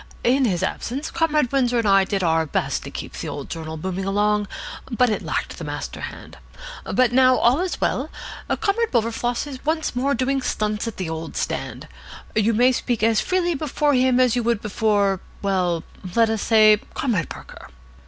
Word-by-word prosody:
In 260 +2 +3
his 180 -7 0
absence 275 +6 -3
Comrade 305 -6 +1
Windsor 250 -3 +2
and 230 -2 +1
I 195 -1 +5
did 195 -1 -1
our 160 -1 +2
best - - -1
to - - -7
keep - - -7
the - - -6
old - - -7
journal 160 -1 -5
booming 185 +3 -3
along, 205 +1 +1 0.4
but 245 -1 +2
it 210 - -1
lacked - - -3
the - - -6
master - - -5
hand. - - -9 0.5
But 250 -2 +3
now 255 0 +5
all 245 +5 +3
is 365 0 -2
well: - - 0 0.5
Comrade 445 +2 +1
Wilberfloss 235 +1 0
is 270 -3 -8
once 315 -3 -1
more 275 +3 +1
doing 265 +2 0
stunts 215 -2 -1
at 230 - -5
the 185 - -3
old 160 0 -5
stand. - - -3 0.5
You 220 +1 +2
may 250 +3 +5
speak 240 -3 -1
as 225 -1 +3
freely 360 -2 0
before 295 0 0
him 255 -1 +3
as 255 -2 +4
you 245 - +1
would 235 -2 +1
before 205 -2 +1 0.2
well, 180 -4 0 0.3
let 230 -1 +4
us 220 -2 -1
say 215 -1 +5
Comrade 210 - 0
Parker." - - -11
230 Hz, 185 wpm, -22 LUFS, 205-260 Hz, 0.5 s, I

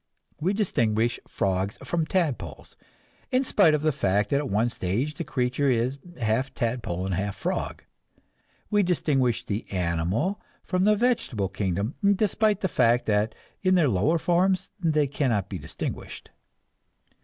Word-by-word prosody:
We 180 +6 +1
distinguish 120 - +1
frogs 95 +1 -1
from 165 -2 -1
tadpoles, 160 - -2 0.6
in 255 +1 +3
spite 185 - +4
of 150 - -2
the 155 - +3
fact 105 -6 0
that 140 - +3
at 140 -2 -2
one 110 +4 +2
stage 120 +8 -2
the - - -4
creature 130 +2 0
is 125 +3 0 0.2
half 115 +4 0
tadpole 115 -7 -2
and 95 - -2
half 95 +2 -2
frog. - - -3 0.9
We 205 -1 +4
distinguish 135 - +1
the 105 +2 -4
animal 90 - 0 0.2
from 185 0 0
the 210 0 +5
vegetable 200 - 0
kingdom, 100 - -2 0.2
despite 210 0 +1
the 190 - +2
fact 120 -6 +2
that 105 +1 +1 0.3
in 185 -1 +3
their 165 -6 +4
lower 115 - +2
forms 180 +3 +1
they 155 -4 +2
cannot 125 -8 0
be 95 - -5
distinguished. - - -6
130 Hz, 145 wpm, -26 LUFS, 105-175 Hz, 0.9 s, the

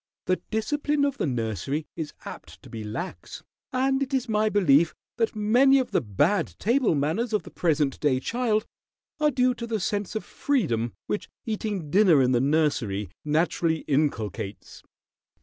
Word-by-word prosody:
The 185 - 0
discipline 290 +6 0
of 280 -1 -2
the - - 0
nursery 120 - -2
is 160 -3 -4
apt - - -9
to - - -13
be 110 -1 -6
lax, 115 - -6 0.3
and 265 +1 +1
it 270 0 -1
is 255 -1 -1
my 215 -1 +2
belief 170 -6 +4 0.2
that 225 -1 0
many 245 +6 +5
of 260 -2 -1
the - - +2
bad 145 - +1
table 235 - +2
manners 165 - -1
of 210 - +1
the - - -12
present 150 -5 0
day 135 -4 +2
child 225 - 0 0.5
are 300 0 +4
due 255 -2 +2
to 235 -1 -6
the 225 -2 -1
sense 205 +2 -2
of 220 - -3
freedom 135 - -1
which 205 - -3 0.2
eating 205 -8 -3
dinner 185 -6 +5
in 130 -1 +3
the 120 -1 +3
nursery 130 - 0
naturally 160 +1 +1
inculcates." 115 - -2
185 Hz, 165 wpm, -26 LUFS, 140-235 Hz, 0.5 s, many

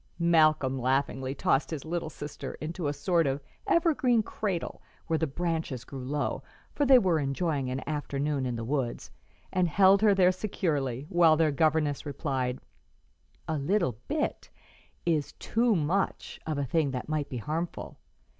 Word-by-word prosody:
Malcolm 155 -6 +3
laughingly 130 +1 0
tossed 135 0 +1
his 160 -3 -5
little 170 0 -3
sister 145 -1 -7
into 160 +1 -4
a - - +1
sort 160 +3 +1
of 135 +1 0 0.3
evergreen 275 -9 +3
cradle 195 -5 -3 0.2
where 160 -1 0
the 160 - +1
branches 160 -4 -2
grew 135 0 -8
low 145 +3 -2 0.3
for 290 - +1
they 265 -1 +9
were 180 -8 +3
enjoying 140 -1 -1
an 130 +1 -4
afternoon 145 -2 -1
in 125 - -2
the 115 - -4
woods 130 -1 -2 0.4
and 180 -1 +2
held 195 +4 +5
her 210 -2 +5
there 185 -1 +5
securely, 150 - -2
while 170 -4 +5
their 160 -1 +3
governess 150 -1 +1
replied, 135 -3 -2 0.9
"'A 155 -2 -1
little 170 - +1
bit' 300 +1 -2 0.6
is 155 -4 0
too 230 -1 +1
much 175 +4 -1
of 155 -2 -1
a 140 - 0
thing 155 +2 +1
that 125 -2 -4
might 155 -2 -2
be 125 - -4
harmful. 160 +8 -4
155 Hz, 155 wpm, -28 LUFS, 135-175 Hz, 0.9 s, they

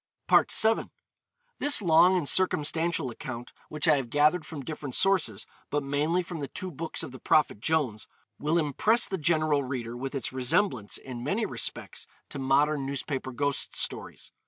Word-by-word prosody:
VII. 220 +1 +4 0.7
This 290 0 +6
long 180 0 +4
and 160 -5 -2
circumstantial 165 -2 +2
account, 120 +1 -8 0.2
which 150 +2 -2
I 155 -2 +5
have 130 -3 -4
gathered 150 +4 +2
from 145 -5 -8
different 150 -4 -6
sources, 185 - +2 0.2
but 145 -1 -1
mainly 150 +6 0
from 170 -1 -7
the 140 - -4
two 185 +7 -6
books 165 +2 -4
of 150 - -7
the 130 - -11
Prophet 150 -8 +2
Jones, 130 -5 -1 0.3
will 155 +3 0
impress 170 - +2
the 190 - -4
general 155 -2 +1
reader 125 -3 -5
with 135 +3 -6
its 135 - -4
resemblance, 130 - 0
in 125 -2 -8
many 200 - -1
respects, - - -5 0.2
to 140 - -6
modern 140 +2 +1
newspaper 135 -1 -4
ghost 145 +2 -2
stories. - - -2
145 Hz, 160 wpm, -27 LUFS, 130-165 Hz, 0.7 s, This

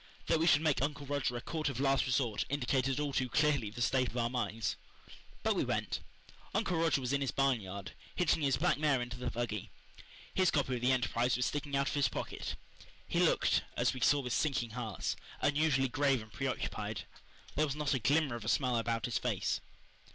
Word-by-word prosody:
That 160 - +2
we 165 - +2
should 155 -2 +5
make 155 -5 +2
Uncle 145 0 -2
Roger 140 -3 -1
a - - -5
court 155 +2 -2
of 130 -3 -4
last 135 -1 +2
resort 120 -4 +1
indicated 135 -1 0
all 145 -2 -1
too 130 -1 0
clearly 140 -3 +2
the 120 +3 -3
state 130 0 +2
of 120 - -6
our 120 0 +1
minds. 115 -3 -1 0.7
But - - +3
we - - +1
went. - - -1 0.6
Uncle 200 -5 +1
Roger 165 -3 +3
was 130 0 -2
in 140 - +1
his 135 - 0
barn 135 -4 +2
yard, 100 0 -7 0.2
hitching 175 -3 +2
his 135 -3 +2
black 170 +2 +2
mare 150 -4 +3
into 120 0 -4
the 125 -1 -2
buggy. 115 -4 -3 0.6
His 185 -1 +3
copy 140 -3 +1
of 120 - -2
the 125 +1 +3
Enterprise 125 -1 +1
was 125 - +1
sticking 145 -1 -2
out 140 0 +2
of - - -3
his 140 -1 +2
pocket. - - -4 0.5
He - - 0
looked, - - +3 0.2
as - - +2
we 130 - -6
saw 145 +3 +4
with 125 -3 -3
sinking 135 -6 0
hearts, 110 -5 -3 0.2
unusually 145 -2 +2
grave 135 -2 +1
and 110 - -16
preoccupied. 135 -2 -3 0.5
There 155 +2 +2
was 140 - -3
not 150 -1 0
a 130 - +1
glimmer 145 +3 +2
of 120 - -6
a - - -2
smile 125 -3 +2
about 115 -1 -1
his 120 - -1
face. - - -1
135 Hz, 210 wpm, -33 LUFS, 120-145 Hz, 0.7 s, should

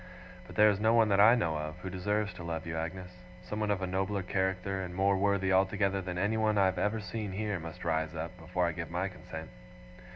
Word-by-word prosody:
But 90 - -11
there 105 +2 +6
is 100 - -2
no 110 +2 +4
one 115 -2 +5
that 100 -1 +3
I 110 +4 +8
know 85 -9 0
of, 75 0 -5
who 95 - -4
deserves 105 +2 -1
to 90 -1 -9
love 85 0 -4
you, 80 -1 -4
Agnes. 90 +3 -4 0.3
Someone 105 0 -2
of 100 -2 0
a - - +2
nobler 95 +2 -1
character, 95 +1 -1
and 90 -1 -6
more 100 +1 +3
worthy 95 -1 +2
altogether 95 +1 +2
than 90 -1 -5
anyone 110 +2 +1
I 100 - +5
have 95 -1 +1
ever 105 +4 0
seen 105 0 -5
here, 105 -1 -2
must 85 0 -8
rise 80 0 0
up, 80 +3 -5
before 90 +2 -1
I 85 - +1
give 85 0 -5
my 90 +3 -1
consent. 85 -6 -9
95 Hz, 230 wpm, -31 LUFS, 90-100 Hz, 0.3 s, I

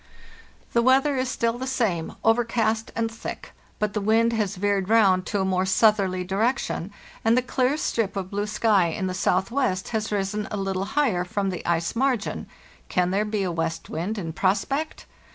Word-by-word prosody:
"The 235 - +4
weather 265 +3 +4
is 255 -1 -1
still 230 -1 -1
the 260 - -4
same, 205 -11 -1
overcast 225 -1 +1
and 225 0 -1
thick; 225 - -7 0.3
but 210 -1 -1
the 210 - -1
wind 225 +3 +3
has 210 -3 -1
veered 200 0 0
round 195 -5 +4
to 205 -3 0
a - - 0
more 185 -1 +1
southerly 190 -1 +3
di 190 +2 -3
rection, 225 -5 0 0.3
and 225 +2 +4
the 250 - +2
clear 255 +3 +1
strip 225 -9 -1
of 190 -1 -4
blue 205 +1 -2
sky 210 -4 +3
in 170 +3 -3
the 185 - -2
southwest 195 +1 0
can - - -9
there 225 - +1
has 215 0 -5
risen 205 +1 -1
a 210 - -3
little 195 -1 -2
higher 225 -7 +1
from 195 +2 -2
the 180 - -5
ice 170 +3 0
margin 250 -3 0 0.8
be 210 -2 0
a 185 - -1
west 165 -1 -3
wind 180 +8 -3
in 165 -5 -4
prospect? 210 - -1
210 Hz, 190 wpm, -25 LUFS, 190-230 Hz, 0.8 s, The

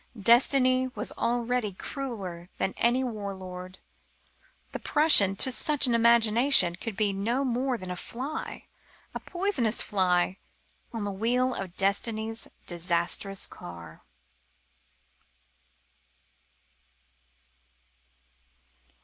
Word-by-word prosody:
Destiny 255 +3 +3
was - - -2
already 240 -2 -1
crueller 190 -8 -7
than 190 - -1
any 245 +3 +2
war 210 -5 -5
lord. 185 0 -9 0.9
The - - -6
Prussian, 215 -11 +5
to 260 - +3
such 295 +3 +2
an 245 - +1
imagination, 235 -3 +5
could 215 +1 -7
be 210 -2 +1
no 235 +8 -1
more 255 +1 -1
than 185 -3 -7
a - - -4
fly 260 - -6 0.5
a - - -5
poisonous 350 - -1
fly 185 -2 +1 0.5
on 225 -3 -5
the 205 - -3
wheel 245 +6 0
of 185 -5 -6
destiny's 220 +3 -1 0.2
disastrous 175 +2 0
car. 85 -2 -10
225 Hz, 100 wpm, -27 LUFS, 190-250 Hz, 0.9 s, Prussian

